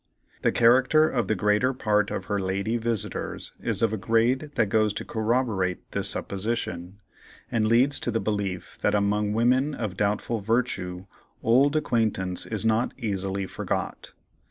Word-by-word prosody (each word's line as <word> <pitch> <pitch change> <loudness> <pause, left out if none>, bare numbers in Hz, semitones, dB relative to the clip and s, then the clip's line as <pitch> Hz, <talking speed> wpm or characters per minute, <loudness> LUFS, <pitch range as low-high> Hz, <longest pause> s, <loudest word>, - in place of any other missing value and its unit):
The - - +2
character 130 +6 +4
of 120 -9 -1
the 110 - +1
greater 105 +7 +2
part 105 -4 +1
of - - -4
her 100 -1 -1
"lady" 100 +4 -1
visitors 110 -2 -3
is - - +2
of 110 -1 +2
a - - -1
grade 115 +7 +1
that 115 - +3
goes 110 0 +2
to - - -5
corroborate 110 -5 -1
this - - +1
supposition, 95 -3 -3 0.5
and 110 -2 +1
leads 125 +5 +4
to - - -2
the 115 -1 0
belief 100 -4 -3
that - - +2
among 105 0 +1
women 130 +6 +2
of 105 -7 -4
doubtful 105 +2 -1
virtue 100 -5 -1 0.4
"old 135 +6 +4
acquaintance" 110 -10 0
is 110 0 -3
not 110 +2 +1
easily 100 -4 -2
"forgot." - - -4
110 Hz, 155 wpm, -26 LUFS, 100-120 Hz, 0.5 s, character